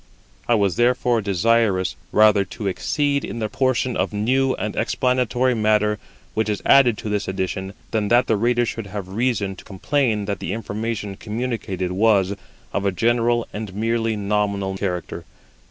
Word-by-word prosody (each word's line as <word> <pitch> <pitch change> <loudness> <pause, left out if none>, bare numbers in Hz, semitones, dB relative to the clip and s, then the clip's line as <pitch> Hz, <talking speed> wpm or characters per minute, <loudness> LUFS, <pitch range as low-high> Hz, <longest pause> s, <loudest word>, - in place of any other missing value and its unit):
I 120 - +4
was 100 -5 +1
therefore 120 -1 +2
desirous 100 0 +1 0.2
rather 105 -2 +5
to 105 - -8
exceed 140 +8 0
in - - -5
the 110 -2 -1
portion 130 -1 0
of - - 0
new 130 +6 +1
and 105 - -4
explanatory 125 +1 +1
matter 105 -1 +2 0.3
which 110 0 0
is 105 - -1
added 125 -5 +5
to 110 - -5
this 105 -1 -1
edition 95 +1 -3 0.2
than 110 -2 0
that 120 +3 +4
the 110 - +2
reader 120 +3 +2
should 115 -2 -5
have 100 -2 -6
reason 105 -2 -1
to - - -12
complain 110 +1 0
that 100 -2 -3
the 90 - -3
information 105 -2 -4
communicated 110 -5 -3
was 100 -1 +3 0.4
of 100 - -1
a 100 - +2
general 120 +3 +1
and 105 -3 -6
merely 115 +1 0
nominal 100 -1 -1
character. 90 -3 -4
110 Hz, 160 wpm, -22 LUFS, 100-120 Hz, 0.4 s, rather